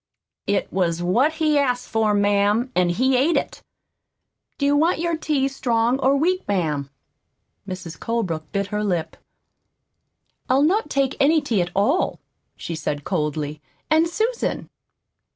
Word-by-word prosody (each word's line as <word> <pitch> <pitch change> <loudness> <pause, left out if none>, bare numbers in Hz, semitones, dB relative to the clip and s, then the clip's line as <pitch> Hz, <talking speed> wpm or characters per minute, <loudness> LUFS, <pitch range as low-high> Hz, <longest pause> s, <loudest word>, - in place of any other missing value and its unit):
"It 200 - -1
was 175 -2 0
what 240 - +2
he 310 -2 +2
asked 250 -3 0
for, 220 -2 +1
ma'am, 205 +4 +2
an' 180 -1 +3
he's 255 +10 +1
ate 275 +7 +3
it. - - -3 1.0
Do 280 - -1
you 285 +1 +3
want 325 +5 +3
your 340 0 -1
tea 300 -4 0
strong 245 -2 0
or 275 +1 +3
weak, 365 +5 0
ma'am?" 155 -8 -1 0.8
Mrs. 180 -3 -7
Colebrook 185 -10 -3
bit 200 -1 -1
her 210 0 0
lip. 175 -6 -2 1.3
"I'll 265 +2 +4
not 360 +2 +2
take 275 -2 0
any 305 +3 +4
tea 235 -10 0
at 175 - -2
all," 245 - +1 0.4
she 170 - -5
said 150 -2 -3
coldly. 150 -3 -2 0.3
"And, 320 +2 +4
Susan!" 450 +6 -2
235 Hz, 145 wpm, -22 LUFS, 180-290 Hz, 1.3 s, I'll